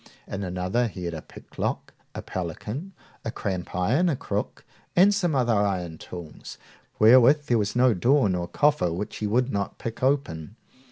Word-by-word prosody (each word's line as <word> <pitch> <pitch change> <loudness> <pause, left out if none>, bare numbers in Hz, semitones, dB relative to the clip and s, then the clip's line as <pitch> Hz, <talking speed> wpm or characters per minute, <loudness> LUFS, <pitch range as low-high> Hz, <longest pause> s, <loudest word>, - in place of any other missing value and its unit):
In 100 - -5
another 95 +6 -1
he 95 -4 -8
had 85 -1 -3
a 80 - -5
picklock, - - -5 0.2
a - - -5
pelican, 105 - -5 0.3
a - - -3
crampiron, 100 - 0
a 155 - +1
crook, - - -4 0.3
and 195 +4 +6
some 175 -6 0
other 120 -3 +2
iron 95 -6 -1
tools, 85 -4 -9 0.4
wherewith 130 +6 +6
there 120 -4 +2
was 105 +1 -1
no 125 -1 +5
door 125 +6 +3
nor 90 -2 -1
coffer 145 - +2
which 95 +5 -4
he 105 - -2
would 125 +5 +1
not 100 -1 -3
pick 115 -1 -6
open. 110 - -1
110 Hz, 165 wpm, -25 LUFS, 90-130 Hz, 0.4 s, and